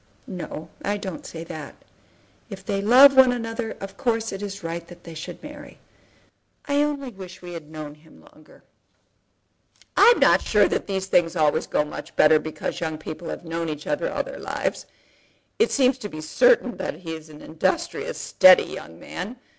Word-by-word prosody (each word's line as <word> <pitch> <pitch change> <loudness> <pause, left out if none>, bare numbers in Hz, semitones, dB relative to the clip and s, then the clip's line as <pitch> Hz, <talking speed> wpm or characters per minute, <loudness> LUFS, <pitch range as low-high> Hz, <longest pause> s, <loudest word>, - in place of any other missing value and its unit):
"No; 170 -3 -7
I 205 +1 0
don't 190 -4 -7
say 165 0 -7
that. 155 -2 -8 0.7
If 195 -2 -9
they 195 0 -1
love 260 +6 +8
one 260 -1 +7
another 225 -1 -3
of 195 0 -8
course 225 -2 0
it 195 - -6
is 200 -2 -6
right 170 0 -5
that 175 -1 -14
they 165 - -10
should 165 - -8
marry. 295 -1 -11 0.9
I 285 0 +1
only 285 -3 -2
wish 190 -2 -11
we 175 0 -8
had 160 -3 -8
known 155 -2 -7
him 155 +1 -20
longer." 155 - -20 1.3
"I - - +8
am - - -4
not - - +5
sure 210 -2 +3
that - - -2
these 190 -1 -2
things 175 -2 +2
always 155 -3 +2
go 150 - +1
much 150 - -9
better 155 0 +6
because 155 +2 -5
young 160 -2 -3
people 155 +2 -7
have - - -6
known 165 0 -3
each 150 -1 -6
other 295 +12 -1
all - - -1
their - - -9
lives. - - -3 0.7
It 450 - +4
seems 260 -1 +3
to 210 - -6
be 155 - -8
certain 260 - +3
that - - -4
he 165 -2 -5
is 160 -1 -9
an 150 -1 -13
industrious, 355 - -2
steady 185 -1 +6
young 80 0 -9
man. 205 - -6
190 Hz, 185 wpm, -24 LUFS, 160-245 Hz, 1.3 s, love